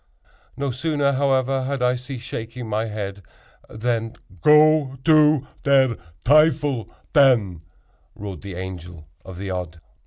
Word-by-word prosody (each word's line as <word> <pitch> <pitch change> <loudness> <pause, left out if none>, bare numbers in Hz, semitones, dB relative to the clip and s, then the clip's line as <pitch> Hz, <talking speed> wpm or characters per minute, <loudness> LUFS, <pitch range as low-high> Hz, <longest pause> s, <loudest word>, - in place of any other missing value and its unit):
No 140 -1 -2
sooner, 145 +2 0
however, 135 -1 0
had 135 -1 -2
I 125 0 +3
ceased 125 -1 -7
shaking 115 +1 -6
my 110 +1 -1
head 100 -2 -6 0.5
than— 115 0 -2 0.3
"Go 150 - +4
to 155 -3 +4 0.2
der 135 -4 +3 0.3
teuffel, 145 - +3 0.2
ten!" 120 - +3 0.5
roared 100 -2 -8
the 100 -3 -8
Angel 90 -3 -8 0.2
of 95 -2 -10
the 95 0 -5
Odd. 90 -3 -5
125 Hz, 125 wpm, -22 LUFS, 100-140 Hz, 0.5 s, Go